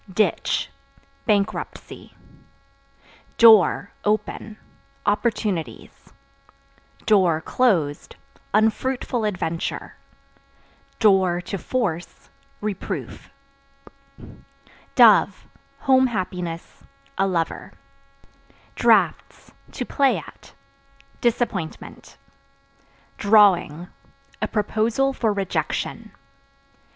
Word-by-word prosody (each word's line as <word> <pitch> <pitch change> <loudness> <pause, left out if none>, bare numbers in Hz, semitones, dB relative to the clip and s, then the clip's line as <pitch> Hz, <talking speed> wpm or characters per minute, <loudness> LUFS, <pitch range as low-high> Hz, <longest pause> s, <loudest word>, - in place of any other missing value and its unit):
Ditch 215 +3 0 0.6
Bankruptcy. 205 -3 -3 1.2
Door 220 -3 +6
(Open) 215 0 -2 0.5
opportunities; 205 - -2 0.9
(closed) 175 - +1 0.4
unfruitful 225 +2 0
adventure; 175 -5 -4 1.1
(to 190 -2 +2
force) 180 -10 -4 0.3
reproof. 205 -2 -5 1.7
Dove - - +5 0.4
Home 260 -1 +4
happiness, 180 -6 -5 0.4
a 195 - +3
lover. 170 -3 -3 1.0
Draughts - - +1 0.2
(To - - -4
play 275 -2 +2
at) - - -12 0.7
disappointment. 230 -8 -3 1.0
Drawing 195 -6 +3 0.5
A - - 0
proposal 225 +5 0
for 225 -4 0
rejection. 195 -2 -3
205 Hz, 60 wpm, -22 LUFS, 180-225 Hz, 1.7 s, Door